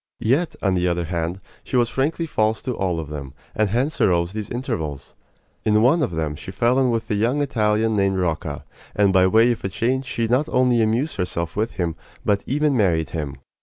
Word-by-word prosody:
Yet, 145 +9 +1
on 95 -2 +2
the 90 -1 +1
other 85 0 0
hand, 85 +2 -3 0.2
she - - -5
was 120 -1 +4
frankly 145 +7 -1
false 110 -7 0
to 125 - -2
all 90 -3 -1
of 80 -3 -6
them, 70 -3 -7 0.2
and 110 -1 +1
hence 130 +9 -1
arose 85 0 +2
these 105 -2 -5
intervals. 80 - -4 0.5
In 105 0 +3
one 145 +7 +4
of 145 - +1
them 80 -3 -2
she 75 - -9
fell 120 +7 +2
in 130 -2 +3
with 115 -1 -1
a - - +3
young 115 +7 +1
Italian 110 -5 +1
named 100 -1 +2
Rocca, 80 -5 -2 0.3
and 100 -2 +3
by 95 -1 +5
way 115 +5 +5
of 120 - -4
a 95 - -1
change 130 +7 -1
she 115 -2 -1
not 125 +6 +1
only 125 -2 +3
amused 115 +8 0
herself 85 -3 -2
with 110 +3 -1
him, 85 -3 -2 0.3
but 100 -1 +2
even 145 +1 +1
married 85 -8 +1
him. 75 -4 -4
105 Hz, 210 wpm, -22 LUFS, 85-125 Hz, 0.5 s, by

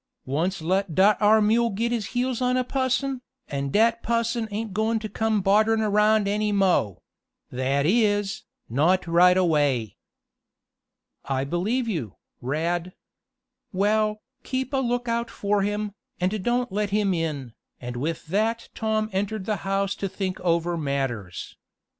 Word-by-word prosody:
Once 165 +6 -1
let 185 0 0
dat 200 +2 +5
ar' 215 +1 +5
mule 230 +3 +3
git 230 +4 -1
his 225 -5 -1
heels 255 0 0
on 250 0 +2
a 255 - +2
pusson, 260 0 -1 0.3
an' 140 0 -2
dat 230 +7 +3
pusson 230 0 0
ain't 215 0 -4
goin' 220 +2 +1
t' 220 0 -4
come 215 -1 0
bodderin' 215 +3 +3
around 210 0 +3
any 210 +1 0
mo' 185 - +1 0.5
that 135 +3 0
is, 205 0 +2 0.3
not 165 +11 +2
right 180 +2 +5
away." 145 - +1 1.3
"I 135 -1 -1
believe 200 - -1
you, 150 - -3 0.3
Rad. 170 +7 -2 0.8
Well, 215 +2 +1 0.2
keep 260 +1 -3
a - - +2
lookout 240 -2 -1
for 205 0 0
him, 205 +1 -2 0.3
and 185 +2 -1
don't 245 0 0
let 205 +1 -1
him 200 -1 +1
in," 150 -8 -3 0.3
and 125 0 -6
with 155 +7 -3
that 220 +7 -1
Tom 220 -1 0
entered 200 +1 -2
the 215 0 -1
house 195 0 -1
to 195 - -3
think 185 -1 -3
over 170 -1 +1
matters. 135 - -3
200 Hz, 145 wpm, -25 LUFS, 170-220 Hz, 1.3 s, dat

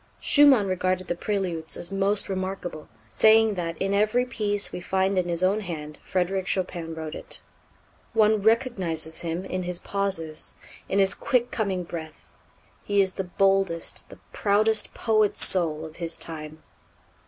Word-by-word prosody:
Schumann 280 -7 +6
regarded 185 0 -1
the 175 - -1
Préludes 175 -4 -2
as 175 - -2
most 200 +1 +1
remarkable, 185 -4 -5 0.2
saying 220 - +4
that 170 -3 -4
"in 195 +1 -1
every 215 +5 +2
piece 205 -4 0
we - - -6
find 190 +2 0
in 180 -1 0
his 170 +1 0
own 195 +3 +2
hand 155 -6 -7
'Frédéric 185 +1 -1
Chopin 175 -3 -2
wrote 160 -1 -6
it.' - - -4 0.7
One 215 -1 +3
recognizes 195 -9 0
him 170 +2 -4
in 185 -1 -3
his 180 -1 -3
pauses, 185 -6 -3 0.3
in 195 - 0
his 195 -1 +4
quick 245 -3 0
coming 195 -5 -1
breath. 160 -2 -9 0.5
He 205 0 0
is 190 -1 +3
the 190 - -3
boldest, 195 -2 0
the - - -12 0.2
proudest 215 +2 +2
poet 215 -2 +1
soul 160 -4 +4
of 155 0 -11
his 170 -1 -1
time." 155 -1 -7
190 Hz, 155 wpm, -25 LUFS, 170-205 Hz, 0.7 s, Schumann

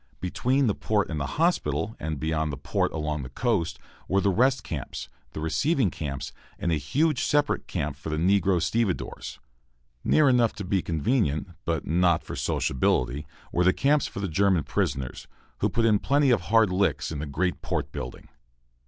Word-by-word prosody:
Between 120 +9 +1
the 105 - +2
port 105 -3 0
and 80 - -2
the 70 - -2
hospital, 110 - +1
and 80 -2 -3
beyond 80 0 -1
the 70 - -5
port 70 - -1
along 75 -2 -2
the 65 - -7
coast, 90 - 0 0.3
were 95 - +2
the 100 0 +2
rest 130 +7 +2
camps, 70 -6 -5 0.2
the - - -5
receiving 120 - +1
camps, 70 -4 -5 0.2
and 85 - -1
a - - +3
huge 135 - +1
separate 145 0 +1
camp 75 -5 -2
for 70 +3 -7
the 80 - -1
negro 95 +1 +3
stevedores. 90 +4 -2 0.7
Near 155 -2 +4
enough 120 -3 +4
to 100 - -6
be 95 0 +1
convenient, 80 - 0 0.2
but 85 -2 -1
not 85 0 +2
for - - -6
sociability, 65 +3 0 0.2
were 90 - +2
the 95 +1 +5
camps 145 +1 +2
for 100 - -6
the 100 - -1
German 95 -1 +2
prisoners, 65 -2 -2 0.3
who - - +2
put 115 0 +1
in 105 -2 +4
plenty 140 -1 +3
of 115 - +3
hard 110 +1 +3
licks 95 -2 +1
in 75 - -4
the 75 - -4
great 90 +6 -1
port - - -2
building. - - -7
90 Hz, 180 wpm, -26 LUFS, 75-115 Hz, 0.7 s, the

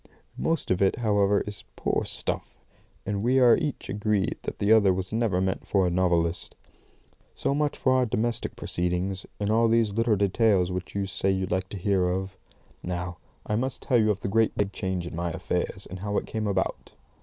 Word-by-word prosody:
'" - - -31
Most 165 - +1
of 90 - +1
it, 95 - +3
however, 105 -3 +2
is 105 0 -7
poor - - -1
stuff, - - -3 0.5
and 100 -1 -2
we 125 +4 +2
are 125 -3 +7
each 150 -5 -3
agreed 105 -1 0
that - - -5
the 100 +1 +1
other 105 -4 +6
was 95 +2 -3
never 110 -5 +1
meant 95 0 -2
for 95 -2 +2
a 90 - +1
novelist. 85 -1 0 0.8
So - - 0
much 145 0 0
for 130 - +2
our 130 -1 +3
domestic 120 0 -1
proceedings, 90 +2 -2
and 105 0 0
all 115 +1 +4
these 115 -2 +2
little 115 0 +2
details 100 -2 +2
which 90 +1 -5
you 100 -1 0
say 95 0 0
you 95 -1 +1
like 95 +1 -2
to 100 - -6
hear 95 -1 +1
of. 95 +1 -3 0.5
Now 90 -1 -4 0.3
I 105 - -1
must 130 +2 -2
tell 125 - +3
you 110 -1 +3
of 100 -2 0
the - - -2
great 110 +3 +2
big 100 -1 0
change 95 -3 -3
in 85 - -6
my 85 +1 -2
affairs, 80 - -2
and 95 - -8
how 105 +1 -2
it - - -1
came 110 -1 -3
about. 100 - -2
100 Hz, 205 wpm, -26 LUFS, 95-110 Hz, 0.8 s, are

